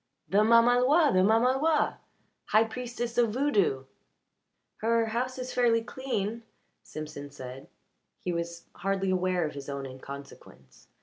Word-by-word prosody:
"The 200 Hz, -, +2 dB
mamaloi 245 Hz, +7 st, +5 dB
the 185 Hz, -, +4 dB
mamaloi 255 Hz, +9 st, +3 dB, 0.5 s
high 215 Hz, +1 st, +4 dB
priestess 240 Hz, +1 st, -4 dB
of 235 Hz, -2 st, +4 dB
voodoo." 205 Hz, -, +1 dB, 0.9 s
"Her 230 Hz, +1 st, +2 dB
house 245 Hz, +4 st, -2 dB
is 255 Hz, 0 st, -5 dB
fairly 230 Hz, -2 st, +3 dB
clean," 230 Hz, -3 st, -3 dB, 0.4 s
Simpson 150 Hz, -2 st, -8 dB
said. 130 Hz, -1 st, -9 dB, 0.5 s
He 180 Hz, -, -3 dB
was 170 Hz, 0 st, -4 dB
hardly 195 Hz, +1 st, -1 dB
aware 185 Hz, -2 st, +1 dB
of 150 Hz, -, -4 dB
his 140 Hz, 0 st, -8 dB
own 140 Hz, -1 st, -4 dB
inconsequence. 135 Hz, -, -11 dB
215 Hz, 125 wpm, -28 LUFS, 155-245 Hz, 0.9 s, mamaloi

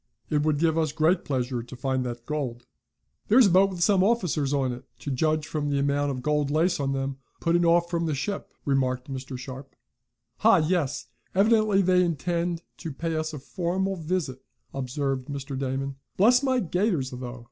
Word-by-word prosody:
It 150 Hz, -1 st, +2 dB
would 150 Hz, -1 st, +1 dB
give 160 Hz, +1 st, +2 dB
us 155 Hz, -2 st, +1 dB
great 160 Hz, +5 st, +2 dB
pleasure 125 Hz, -3 st, -2 dB
to 120 Hz, +2 st, -10 dB
find 130 Hz, 0 st, -1 dB
that 120 Hz, -1 st, -6 dB
gold." 130 Hz, -6 st, -3 dB, 0.6 s
"There's 240 Hz, +3 st, +7 dB
a 195 Hz, -, +4 dB
boat, 190 Hz, +2 st, +5 dB
with 180 Hz, -3 st, -2 dB
some 195 Hz, -1 st, +4 dB
officers 180 Hz, -10 st, +1 dB
in 135 Hz, -3 st, +1 dB
it, 125 Hz, +1 st, -8 dB
to 140 Hz, -, -5 dB
judge 155 Hz, +3 st, 0 dB
by 155 Hz, -, 0 dB
the 145 Hz, -1 st, 0 dB
amount 140 Hz, +1 st, +1 dB
of 130 Hz, -2 st, -4 dB
gold 150 Hz, -1 st, +1 dB
lace 165 Hz, +4 st, +2 dB
on 135 Hz, -1 st, 0 dB
them, 135 Hz, 0 st, -2 dB, 0.2 s
putting 170 Hz, +1 st, +2 dB
off 170 Hz, +1 st, +4 dB
from 170 Hz, -1 st, -1 dB
the 155 Hz, -, 0 dB
ship," 200 Hz, +9 st, -4 dB
remarked 130 Hz, -1 st, 0 dB
Mr. 130 Hz, 0 st, -5 dB
Sharp. 135 Hz, +2 st, -9 dB, 0.6 s
"Ha! 225 Hz, +2 st, +5 dB
Yes! 160 Hz, -3 st, 0 dB, 0.3 s
Evidently 210 Hz, -1 st, +4 dB
they 180 Hz, 0 st, +4 dB
intend 170 Hz, +1 st, -1 dB
to 165 Hz, -, -6 dB
pay 165 Hz, +3 st, -3 dB
us 155 Hz, 0 st, -2 dB
a 150 Hz, -, -6 dB
formal 185 Hz, +6 st, -2 dB
visit," 160 Hz, -6 st, -3 dB, 0.3 s
observed 135 Hz, 0 st, -2 dB
Mr. 140 Hz, -1 st, -5 dB
Damon. 135 Hz, +1 st, -3 dB, 0.2 s
"Bless 245 Hz, +6 st, +5 dB
my 260 Hz, -2 st, +2 dB
gaiters, 180 Hz, -, 0 dB
though. 125 Hz, -1 st, -6 dB
150 Hz, 185 wpm, -26 LUFS, 135-175 Hz, 0.6 s, There's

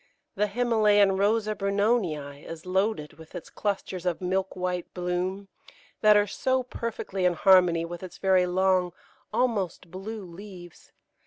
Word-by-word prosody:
The 210 Hz, +2 st, +1 dB
Himalayan 210 Hz, -3 st, +3 dB
Rosa 215 Hz, +2 st, +2 dB
Brunonii 200 Hz, -8 st, -1 dB
is 165 Hz, 0 st, -9 dB
loaded 185 Hz, -4 st, -1 dB
with 160 Hz, +2 st, -13 dB
its 175 Hz, -, -8 dB
clusters 195 Hz, -3 st, -3 dB
of 180 Hz, -2 st, -1 dB
milk 190 Hz, +1 st, -1 dB
white 180 Hz, -1 st, -3 dB
bloom, 180 Hz, +2 st, -2 dB, 0.5 s
that 215 Hz, -1 st, +7 dB
are 205 Hz, -, +4 dB
so 260 Hz, +4 st, 0 dB
perfectly 230 Hz, -6 st, -4 dB
in 180 Hz, -1 st, +4 dB
harmony 175 Hz, -2 st, +4 dB
with 170 Hz, 0 st, -7 dB
its 185 Hz, -2 st, -9 dB
very 185 Hz, -2 st, +3 dB
long, 185 Hz, -1 st, +2 dB, 0.4 s
almost 195 Hz, -8 st, -1 dB
blue 200 Hz, +3 st, -6 dB
leaves. 175 Hz, -1 st, -12 dB
190 Hz, 140 wpm, -27 LUFS, 180-210 Hz, 0.5 s, that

